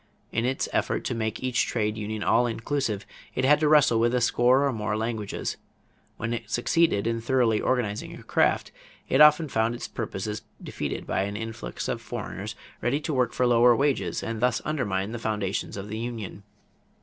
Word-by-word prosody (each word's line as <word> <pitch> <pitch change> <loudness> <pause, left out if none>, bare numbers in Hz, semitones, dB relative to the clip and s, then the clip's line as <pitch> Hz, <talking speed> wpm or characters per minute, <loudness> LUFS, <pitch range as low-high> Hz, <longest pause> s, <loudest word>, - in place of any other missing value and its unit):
In 115 +1 0
its 130 +1 0
effort - - 0
to - - -2
make 110 +1 -3
each 130 -2 +1
trade 105 -2 -1
union 105 0 -4
all 120 +2 +3
inclusive, 115 -3 -2 0.3
it 130 - +1
had 150 +2 +5
to 155 - +2
wrestle 145 -6 +5
with 120 +2 +2
a - - +3
score 125 +3 +4
or 140 - +1
more 105 -1 -2
languages. 110 -2 -3 0.6
When 115 +1 -2
it 115 -2 -5
succeeded 120 -4 +2
in 115 0 -1
thoroughly 115 -3 +2
organizing 115 -5 -1
a - - -12
craft, - - +1 0.4
it 135 - +4
often 150 +1 +7
found 115 -2 0
its - - -6
purposes 105 -1 -4 0.2
defeated - - -4
by - - 0
an 100 +1 -4
influx 115 +1 -5
of - - -2
foreigners 105 +4 -6 0.3
ready 130 +4 +1
to 155 0 -3
work 125 -3 +2
for 125 - +1
lower 120 0 +6
wages 140 +2 0
and 115 -1 -3
thus 125 -2 +2
undermine 105 -10 -1
the 120 - -5
foundations 105 -4 -2
of 100 +1 -6
the 110 +1 -5
union. 115 -4 -5
115 Hz, 185 wpm, -26 LUFS, 110-125 Hz, 0.6 s, often